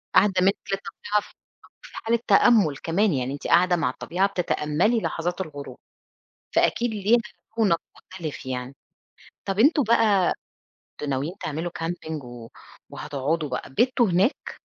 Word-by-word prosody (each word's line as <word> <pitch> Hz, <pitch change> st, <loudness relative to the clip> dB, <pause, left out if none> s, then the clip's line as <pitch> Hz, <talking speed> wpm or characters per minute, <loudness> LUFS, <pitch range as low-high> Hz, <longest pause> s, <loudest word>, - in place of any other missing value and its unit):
قاعدة 205 Hz, -2 st, +5 dB
منِّك 195 Hz, +2 st, +4 dB, 0.2 s
للطبيعة 200 Hz, +1 st, -2 dB
ف -, -, -16 dB, 0.5 s
في -, -, -14 dB
حالة 230 Hz, +1 st, 0 dB
تأمُّل 205 Hz, -, +5 dB
كمان، 190 Hz, +4 st, +1 dB
يعني 130 Hz, 0 st, -2 dB
أنتِ 145 Hz, -, -6 dB
قاعدة 180 Hz, +1 st, +4 dB
مع 165 Hz, -7 st, 0 dB
الطبيعة 180 Hz, +9 st, -1 dB
بتتأملي 180 Hz, +3 st, 0 dB
لحظات 175 Hz, +1 st, -2 dB
الغروب، 145 Hz, -5 st, -8 dB, 0.8 s
فأكيد 240 Hz, 0 st, +2 dB
ليها 215 Hz, +2 st, +3 dB, 0.4 s
رونق 185 Hz, -7 st, +3 dB
مختلف 165 Hz, -7 st, -8 dB
يعني، 130 Hz, +1 st, -5 dB, 0.7 s
طب 195 Hz, +1 st, -2 dB
أنتم 290 Hz, +4 st, +5 dB
بقى 215 Hz, -5 st, +3 dB, 0.7 s
كنتم 150 Hz, -, -3 dB
ناويين 140 Hz, +6 st, -2 dB
تعملوا 160 Hz, +3 st, -3 dB
كامبنج 165 Hz, -3 st, -4 dB
و 120 Hz, -2 st, -10 dB, 0.4 s
وهتقعدوا 150 Hz, +2 st, -2 dB
بقى، 125 Hz, +1 st, -5 dB
بِتّوا 240 Hz, -, +2 dB
هناك؟ 185 Hz, -, 0 dB
175 Hz, 135 wpm, -24 LUFS, 150-210 Hz, 0.8 s, قاعدة